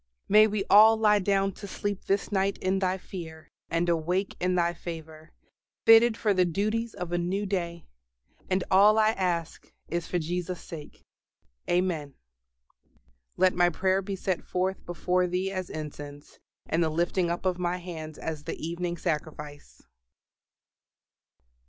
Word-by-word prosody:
May 215 +1 +7
we 210 -2 -1
all 220 +2 +7
lie 210 -1 +4
down 195 0 +1
to 200 +2 -10
sleep 200 0 -4
this 195 +2 0
night 195 0 +1
in 190 +1 0
Thy 185 -1 0
fear, 160 -4 -9 0.2
and 165 +1 0
awake 175 +4 0
in 180 0 +1
Thy 170 -1 +2
favor, 160 -2 -9 0.5
fitted 225 0 +7
for 210 -3 +2
the 185 -1 +3
duties 215 +6 -1
of 180 -3 -5
a 175 - 0
new 190 +4 -1
day. 170 -4 -3 0.6
And 185 -1 +1
all 205 +3 +6
I 220 0 +4
ask 175 -6 -3 0.2
is 170 0 -2
for 180 - -1
Jesus' 175 +2 -3
sake. 155 -3 -10 0.7
Amen. 175 -6 0 1.2
"LET 185 0 +4
MY 175 0 +4
PRAYER 190 +3 +1
BE 195 0 -4
SET 190 -1 -2
FORTH 185 +1 -2
BEFORE 180 +2 0
THEE 185 +2 -1
AS 185 -2 -4
INCENSE: 145 -2 -8 0.3
AND 165 +1 +1
THE 160 - +1
LIFTING 175 +2 0
UP 175 +2 -3
OF 180 -1 0
MY 175 0 -1
HANDS 160 -4 -8
AS 155 -2 -5
THE 165 - -4
EVENING 170 +2 -4
SACRIFICE." 150 -3 -5
180 Hz, 150 wpm, -27 LUFS, 170-195 Hz, 1.2 s, May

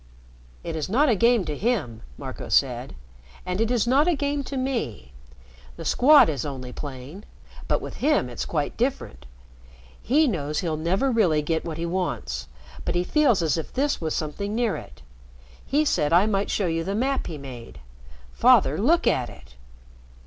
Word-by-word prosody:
"It 165 - -4
is 155 +2 -3
not 275 +8 +3
a 230 - +4
game 230 -1 +3
to 150 - -3
him," 175 - -1 0.2
Marco - - -7
said. - - +1 0.5
"And 180 +3 -2
it 225 - +1
is 240 -3 +1
not 270 +6 +3
a 350 - +3
game 285 0 -1
to 275 - -5
me. 225 - -3 0.6
The - - -9
Squad 290 +3 +6
is 145 -6 -2
only 130 -3 -6
playing, 145 +7 -8 0.4
but - - +1
with - - -8
him 295 - +2
it's 120 - -5
quite 150 -3 -3
different. 225 - -3 0.7
He 300 +6 +3
knows 155 - -2
he'll 165 -4 -1
never 185 - 0
really 175 -10 +2
get 160 +1 -1
what 160 -2 -5
he 165 - -3
wants, 170 - -3 0.4
but - - -2
he 175 - +2
feels 245 - +2
as 160 0 +1
if 160 - -7
this 285 -2 0
was 160 -1 -2
something 200 +7 -3
near 235 -3 +1
it. - - -11 0.6
He 300 +3 +1
said 150 - +1
I 175 +4 +5
might 200 -2 0
show 200 - 0
you 165 -1 -1
the 195 +3 -3
map 265 +4 0
he 160 - -6
made. 125 - -10 0.5
Father, 130 - +4
look 325 +11 +3
at 125 -2 +1
it." - - -15
180 Hz, 180 wpm, -24 LUFS, 150-245 Hz, 0.7 s, Squad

